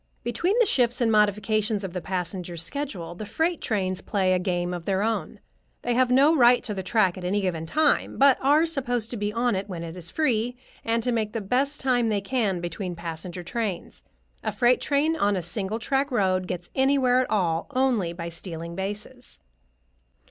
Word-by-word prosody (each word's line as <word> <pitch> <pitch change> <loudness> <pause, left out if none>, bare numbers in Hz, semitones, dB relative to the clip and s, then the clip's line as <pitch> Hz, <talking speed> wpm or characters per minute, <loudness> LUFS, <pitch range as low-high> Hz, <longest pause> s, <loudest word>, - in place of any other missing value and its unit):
Between 350 - 0
the 475 - +5
shifts 245 - +2
and 235 -2 +2
modifications 210 0 +2
of 185 -3 -5
the 180 - -3
passenger 180 0 -4
schedule, 175 - -4
the 180 - -7
freight 325 +10 -1
trains 185 -4 -1
play 190 -2 +1
a 185 - +2
game 180 -1 -1
of 175 -2 -6
their 195 0 +1
own. 225 0 -2 0.4
They 245 - 0
have 255 +1 +3
no 280 +6 +5
right 245 -3 +5
to 215 - -3
the 190 - -3
track 190 -2 +1
at - - -9
any 190 +3 0
given 165 -4 -2
time, 305 - +1
but 275 -1 +5
are 295 +4 +4
supposed 245 -8 -2
to 240 - -3
be 205 0 -1
on 235 0 +1
it 195 +2 -4
when 170 -3 -5
it 165 0 -7
is 175 -2 -6
free, 245 -5 0 0.3
and 230 0 0
to 250 - +1
make 215 -3 -1
the 225 - -1
best 260 +8 0
time 245 -3 +2
they 210 -2 +1
can 200 -4 -1
between 175 +1 -4
passenger 170 +1 -6
trains. 210 -2 -4 0.4
A - - -1
freight 245 0 +3
train, 300 +3 +1
on 205 -9 +1
a 185 - -1
single 195 +4 -3
track 270 +5 0
road, 185 -6 +1
gets 175 -1 -5
anywhere 265 -2 +3
at 255 - 0
all 170 -6 0
only 255 -9 +1
by 170 0 -6
stealing 170 0 -7
bases. 210 - -6
210 Hz, 200 wpm, -25 LUFS, 180-250 Hz, 0.4 s, the